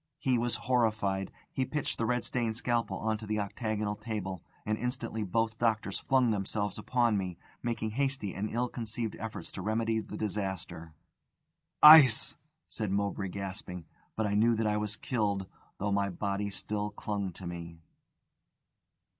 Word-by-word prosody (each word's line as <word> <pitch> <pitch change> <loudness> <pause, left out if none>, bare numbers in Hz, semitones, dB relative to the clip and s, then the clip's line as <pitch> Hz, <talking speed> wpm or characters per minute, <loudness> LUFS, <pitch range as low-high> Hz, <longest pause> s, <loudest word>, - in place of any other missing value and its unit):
He 130 -1 +1
was 120 0 0
horrified. 110 -6 +1 0.2
He 130 - +1
pitched 150 +2 -2
the 115 - +1
red 125 -1 +1
stained 115 -3 -1
scalpel 120 0 0
on 110 0 -1
to 110 - -8
the 110 0 0
octagonal 105 0 -2
table; 95 -6 -4 0.2
and 110 - +1
instantly 120 -2 -2
both 110 +3 0
doctors 110 -4 +1
flung 130 -3 +3
themselves 105 0 -2
upon 120 -2 +2
me, 90 -3 -4 0.2
making 115 -2 -2
hasty 135 -5 -1
and 105 +3 -2
ill 120 +2 0
conceived 115 -2 -4
efforts 110 0 -6
to 95 - -6
remedy 110 +2 +1
the - - -6
disaster. 95 -6 -4 0.9
"Ice!" 150 -7 +9 0.3
said 110 -3 -3
Mowbray, 100 0 -1
gasping. 95 -2 -6 0.3
But 110 - 0
I 100 - 0
knew 115 +3 +4
that 110 0 0
I 105 0 +2
was 105 0 -2
killed, 105 -6 -1 0.3
though 100 +1 -1
my 100 0 +2
body 100 +2 -2
still 105 +1 -3
clung 100 -2 -3
to 95 - -10
me. 85 -1 -6
105 Hz, 155 wpm, -31 LUFS, 100-115 Hz, 0.9 s, Ice